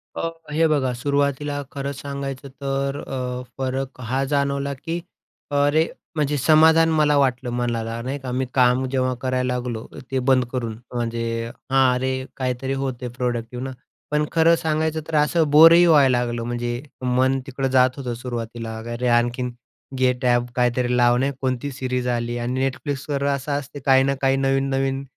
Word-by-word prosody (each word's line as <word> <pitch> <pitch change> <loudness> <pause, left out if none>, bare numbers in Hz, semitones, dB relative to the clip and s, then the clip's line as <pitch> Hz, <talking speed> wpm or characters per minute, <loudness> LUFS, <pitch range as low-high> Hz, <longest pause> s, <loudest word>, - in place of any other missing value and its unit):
अ, 165 - -2 0.2
हे 160 +2 +3
बघा, 140 -5 +1
सुरुवातीला 145 +2 -1
खरंच 140 0 -4
सांगायचं 140 -1 -5
तर 135 0 -1
अ, 125 -1 -4
फरक 130 0 -3
हा 130 +3 -1
जाणवला, 140 0 0
की 165 +6 -4 0.5
अरे, 145 +3 +3 0.3
म्हणजे 150 -1 0
समाधान 160 +3 +5
मला 150 -2 +3
वाटलं 130 -2 +1
मनाला, 115 -1 -2
नाही 135 +4 -4
का. 130 -1 -6
मी 130 +1 -1
काम 125 0 +3
जेव्हा 130 -1 +1
करायला 130 -1 0
लागलो 120 -2 -4 0.3
ते 130 - +1
बंद 130 -1 +4
करून, 115 -4 -3 0.2
म्हणजे 115 -1 -2 0.5
हां, 135 -1 +4
अरे 130 +1 -1
काहीतरी 130 +1 -2
होते, 125 -2 -4
प्रॉडक्टिव्ह 120 0 -3
ना. 135 - -4 0.4
पण 150 0 +2
खरं 165 0 +5
सांगायचं 160 -1 -1
तर 160 - -3
असं 150 +1 +3
बोरही 165 +3 +8
व्हायला 140 -6 +5
लागलं. 120 -1 -2
म्हणजे 120 0 -3 0.2
मन 130 +1 +2
तिकडं 135 0 -2
जात 130 0 +3
होतं 125 -3 -4
सुरुवातीला, 115 -2 -5 0.2
अरे, 125 +1 -2
आणखीन 120 +1 +1 0.5
गेट 125 0 +1
ॲप 120 0 +2
काहीतरी 125 0 +1
लावणे, 120 +3 +3
कोणती 130 +1 -1
सीरीज 125 -1 -2
आली 120 0 -1
आणि 125 +3 0
Netflixवर 140 +1 -4
असं 140 +2 -5
असते, 145 +1 -9
काही 135 -1 +5
ना 140 +1 +1
काही 135 0 +3
नवीन-नवीन 135 0 0
130 Hz, 155 wpm, -22 LUFS, 125-140 Hz, 0.5 s, बोरही